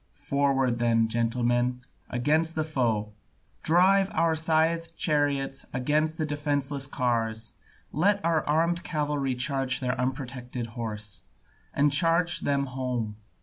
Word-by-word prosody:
Forward 135 -3 0
then, 115 -1 +3
gentlemen, 120 +2 0 0.3
against 155 +7 +1
the 155 - 0
foe; 115 -9 -1 0.5
drive 190 +4 +4
our 165 0 +3
scythed 165 +1 0
chariots 140 -3 0
against 155 +5 0
their 155 - -1
defenceless 145 -2 -1
cars, 115 -4 -2 0.4
let 200 +8 +2
our 165 -2 +2
armed 170 +3 +1
cavalry 145 -4 -1
charge 135 +1 0
their 125 -1 -1
unprotected 125 -2 -4
horse, 105 -5 -6 0.5
and 145 +1 +2
charge 165 +3 +3
them 140 -1 0
home. 125 -5 -3
140 Hz, 115 wpm, -27 LUFS, 125-155 Hz, 0.5 s, drive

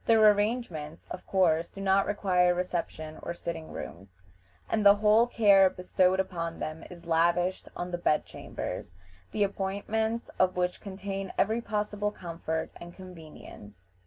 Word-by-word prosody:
Their 220 -2 +7
arrangements, 205 -8 -2
of 185 - -7
course, 170 -3 +2
do - - -11
not 195 0 +2
require 180 -3 +2
reception 170 -3 -4
or 170 - -5
sitting 165 -2 -6
rooms, 95 +2 -9 0.5
and 215 - 0
the 200 0 +8
whole 215 +3 +4
care 200 -5 +5
bestowed 185 0 +1
upon 170 -3 -2
them 155 +1 -5
is 175 -1 -12
lavished 175 +2 +1
on 175 0 -4
the 175 - -3
bed 155 -3 +2
chambers, 90 - -6 0.4
the 210 - +1
appointments 205 +4 -2
of 185 0 +3
which 180 0 -1
contain 195 -1 -5
every 220 +3 +2
possible 210 -1 -2
comfort 165 -4 -4
and 175 0 -11
convenience. 155 - -13
185 Hz, 145 wpm, -29 LUFS, 170-205 Hz, 0.5 s, the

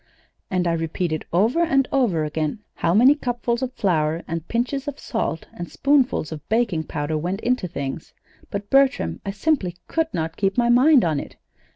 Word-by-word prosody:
"And 180 -1 0
I 170 - +2
repeated 165 0 -2
over 220 - +2
and 275 -6 +2
over 220 - +2
again 155 +7 -3
how 170 +1 0
many 250 +6 +7
cupfuls 240 -3 -2
of 260 -1 -2
flour 165 -6 0
and 165 0 -4
pinches 260 +4 -2
of 290 -1 -5
salt 195 -8 -3
and 175 - -7
spoonfuls 275 - +2
of 155 -2 -6
baking 215 -8 +1
powder 155 +1 -2
went 180 +5 -2
into 250 -6 0
things; 140 -2 -5 0.4
but, 200 0 -5
Bertram, 265 - +2
I - - 0
simply 200 - 0
could 325 - 0
not 165 0 -3
keep 195 +1 0
my 240 -1 +3
mind 255 - +6
on 155 -4 +1
it. - - -9
195 Hz, 180 wpm, -23 LUFS, 165-255 Hz, 0.4 s, many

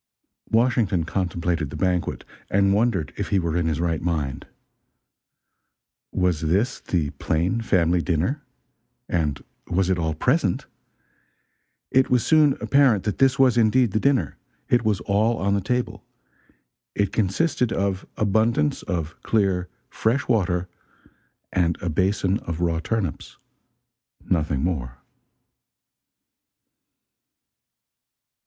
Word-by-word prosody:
Washington 115 -7 +2
contemplated 85 -3 -2
the - - -8
banquet, 90 -2 -1 0.2
and 100 0 +3
wondered 105 - 0
if - - -2
he 100 - +1
were 85 -3 -1
in 85 -2 +1
his 80 -2 -1
right 85 -2 -1
mind. 75 -6 -2 1.6
Was 90 -4 0
this 100 +11 0
the 80 -6 -1
plain 90 +9 0
family 90 -5 +2
dinner? 90 - -1 0.7
And 75 -5 -1 0.2
was 95 +1 +1
it 90 - 0
all 80 -2 -1
present? - - +1 1.3
It 130 0 +3
was 125 -2 +2
soon 155 -3 +4
apparent 135 -8 +3
that 105 0 -3
this 135 0 +4
was 130 -3 +4
indeed 115 0 +3
the 110 - +1
dinner: 130 - +1 0.3
it 120 -1 +3
was 105 -5 0
all 105 +5 +1
on 100 +1 0
the 100 - +1
table: 125 +6 -2 0.9
it 100 -2 0
consisted 120 - 0
of 95 -1 -1
abundance 115 +8 +1
of 85 -5 -4
clear, 95 -5 0 0.2
fresh 120 +5 -1
water, 90 -6 +1 0.9
and 85 -3 +1
a 90 - -3
basin 95 +4 +1
of 85 -1 -5
raw 85 -2 0
turnips 95 -4 -3 0.9
nothing 75 -5 0
more. 65 -8 -2
95 Hz, 120 wpm, -23 LUFS, 85-115 Hz, 1.6 s, soon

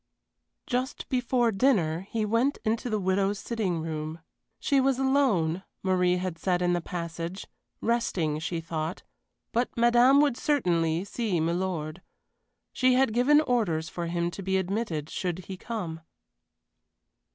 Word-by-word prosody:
Just 255 +2 -2
before 250 -2 +2
dinner 190 - +1
he 220 -2 -1
went 230 +7 +1
into 225 +3 0
the 215 -2 0
widow's 195 +1 +1
sitting 195 -7 -2
room. 155 0 -4 0.4
She 280 -2 +2
was 265 -1 +2
alone, 240 - +2 0.2
Marie 180 -1 +2
had 180 -2 -4
said 180 -1 +1
in 175 0 +2
the 175 - 0
passage 170 +2 -5 0.4
resting, 180 -10 0
she 165 +1 -3
thought, 160 +1 -4 0.5
but 240 +2 +1
madame 240 +3 +6
would 285 -4 +3
certainly 175 - +1
see 205 -4 -1
milord. 170 -1 -2 0.7
She 255 -1 +3
had 260 -3 +3
given 280 +6 +5
orders 205 - 0
for 175 -1 -4
him 170 0 -1
to 195 - -7
be 190 0 0
admitted 190 -5 -2
should 180 -2 -2
he 190 - -6
come. 180 -6 -5
190 Hz, 140 wpm, -27 LUFS, 170-240 Hz, 0.7 s, madame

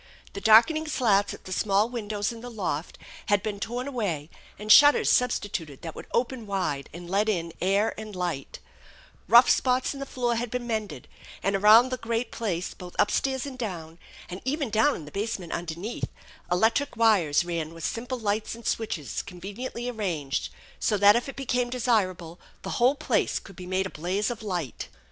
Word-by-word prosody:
The 200 - -6
darkening 310 +9 +5
slats 210 -9 +2
at - - -10
the 185 - -8
small 200 +2 +2
windows 210 -3 -3
in 230 -1 -9
the 245 - -7
loft 180 -8 -4 0.3
had 205 -2 +2
been 205 -2 -3
torn 245 +5 -3
away 185 - -3 0.3
and 210 +1 -1
shutters 290 +6 +7
substituted 180 - -1
that 165 -2 -5
would - - -10
open 240 -1 -1
wide 165 -9 -2
and 175 +2 -9
let 200 +4 +1
in 170 -5 -1
air 200 +4 +2
and 215 -2 -8
light 175 -7 -3 0.7
Kough 235 +3 +8
spots 255 +1 +2
in 275 - -9
the 275 - -5
floor 240 -3 -1
had 240 0 -2
been 250 +1 -3
mended, 215 - -4 0.4
and 195 0 +1
around 215 +5 +7
the 255 - -2
great 230 0 -2
place 185 -6 -3
both 180 -1 -11
up - - +3
stairs 265 -1 0
and 265 -2 -8
down, 170 -7 -5 0.3
and 180 +1 -7
even 275 -2 -2
down 220 +7 +3
in 155 - -8
the 150 - -11
basement 200 -4 -3
underneath, 175 +6 -4 0.4
electric 225 +8 +2
wires 185 -9 +3
ran 165 -2 -3
with 165 -1 -7
simple 245 +3 -3
lights 215 -1 -2
and 235 - -13
switches 190 - -2
conveniently 205 +7 -6
arranged, 165 - -2 0.3
so 210 - +1
that 205 +1 +7
if 240 +3 -1
it - - -8
became 250 -2 -1
desir 235 -5 +2
able 175 -1 -11 0.2
the - - -4
whole 255 +4 +5
place - - 0
could 195 - -10
be 180 0 -9
made 185 +1 0
a 190 - -5
blaze 185 +8 -1
of 235 - -6
light. 175 - -4
210 Hz, 190 wpm, -26 LUFS, 180-240 Hz, 0.7 s, Kough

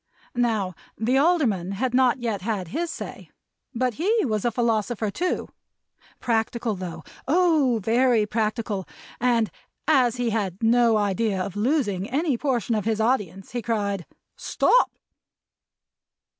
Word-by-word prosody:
Now, 220 -6 0 0.2
the 245 +5 +2
Alderman 250 - +2
had 250 +5 -1
not 255 0 +4
yet 225 -6 -2
had 195 -4 -3
his 335 - -2
say, - - -7 0.5
but 250 +1 0
he 430 +3 +2
was 215 -4 -1
a 240 - +2
philosopher, 225 -2 0
too 360 - -2 0.7
practical 230 -1 0
though! 180 -3 -6 0.2
Oh, 305 -7 +3
very 235 0 +3
practical! 215 -2 -2 0.3
and, 235 -5 +2 0.4
as 255 -6 +4
he 245 -2 -1
had 200 -2 -2
no 230 -1 +4
idea 205 0 0
of 185 +1 -4
losing 210 - 0
any 290 +1 +1
portion 240 -3 -1
of 210 -3 -1
his 220 -1 0
audience, 205 -6 -1
he 240 +1 -3
cried 200 -5 -2 0.3
"Stop!" - - +2
230 Hz, 130 wpm, -24 LUFS, 205-255 Hz, 0.7 s, not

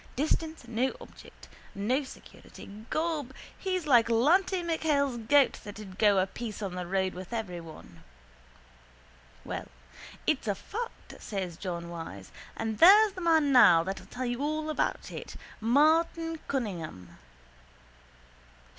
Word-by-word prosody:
Distance 315 0 -2
no 240 +3 -1
object. - - -14 0.3
No 245 +8 0
security. 260 - -13 0.2
Gob, 310 -5 -2 0.2
he's 370 -3 -2
like 240 -6 +5
Lanty 350 +10 +3
MacHale's 295 -6 0
goat 285 -3 +4
that'd 205 -2 -10
go 205 -2 +5
a 185 - +3
piece 215 +1 -7
of 195 - -3
the 180 -1 -5
road 190 0 0
with 185 +3 -9
every 200 -7 -4
one. 155 - -13 1.4
—Well, - - -5 0.6
it's 285 -6 0
a 205 - +1
fact, 460 - -7
says 190 -5 -4
John 170 -2 -5
Wyse. 160 - -8 0.3
And 220 -1 -3
there's 410 +5 +8
the 370 - -8
man 320 -4 +3
now 180 -11 +7
that'll 190 +2 -6
tell 255 +1 -5
you 245 +1 -2
all 310 +1 -1
about - - -2
it, - - -8 0.2
Martin 320 +6 +2
Cunningham. 165 - -5
240 Hz, 130 wpm, -29 LUFS, 190-310 Hz, 1.4 s, there's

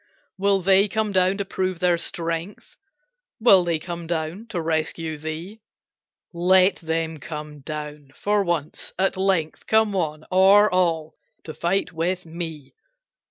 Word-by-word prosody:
"Will 195 -1 +1
they 195 +2 +5
come 215 +1 -1
down, 185 0 +2
to 200 - -2
prove 185 -1 -2
their 175 0 +2
strength? 170 +3 -4 0.6
Will 200 -5 +6
they 170 -2 0
come 170 +1 -7
down, 170 +6 -3
to 180 - -4
rescue 160 0 -2
thee? 165 +8 -7 0.7
Let 185 +2 +4
them 160 -1 -3
come 150 +1 -7
down, 150 0 -7
for 205 0 +1
once, 170 -5 -3
at 190 +1 +1
length, 190 -5 -1
Come 220 -1 +3
one, 155 -4 -2
or 195 +3 +6
all, 165 -4 +1 0.3
to 155 - -7
fight 180 +2 -1
with 180 +2 -2
me. 160 -3 -7
175 Hz, 140 wpm, -23 LUFS, 160-190 Hz, 0.7 s, Will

